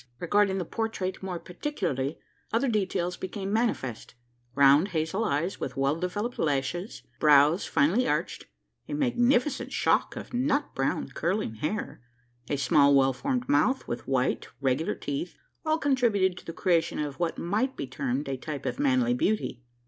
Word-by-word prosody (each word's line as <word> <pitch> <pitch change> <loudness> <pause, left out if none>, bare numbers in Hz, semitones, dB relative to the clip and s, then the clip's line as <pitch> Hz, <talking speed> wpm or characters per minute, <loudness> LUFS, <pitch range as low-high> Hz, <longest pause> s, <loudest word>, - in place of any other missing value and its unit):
Regarding 195 +2 +2
the 180 - -2
portrait 220 -2 -3
more 190 -2 -4
particularly, 170 - -3 0.3
other 235 +5 +1
details 185 -5 -1
became 195 +1 -4
manifest: 175 - -1 0.4
round 140 +5 +6
hazel 170 +4 -1
eyes, 170 -2 -1
with 125 - -5
well 135 +2 +2
developed 205 +8 -3
lashes; 150 +7 -1 0.2
brows 150 +3 +5
finely 195 - +2
arched; - - -2 0.4
a 290 - -2
magnificent 250 0 +1
shock - - +1
of - - -8
nut 275 +4 0
brown 135 +1 -1
curling 170 - -1
hair; 150 - -4 0.5
a 145 - 0
small, 140 0 +4
well 135 -1 +4
formed 250 - -2
mouth, 270 -2 +2
with 120 - -5
white, 130 -1 0
regular 135 +3 0
teeth 145 +5 -4 0.3
all 310 0 +3
contributed 235 - +2
to - - -12
the - - -5
creation 170 -2 +1
of 145 -2 -4
what 170 -2 -1
might 215 +10 -1
be - - -3
termed 130 +1 -3
a 135 -1 -2
type 145 +1 -6
of - - -3
manly 255 -4 +3
beauty. 215 - -1
180 Hz, 155 wpm, -28 LUFS, 140-230 Hz, 0.5 s, round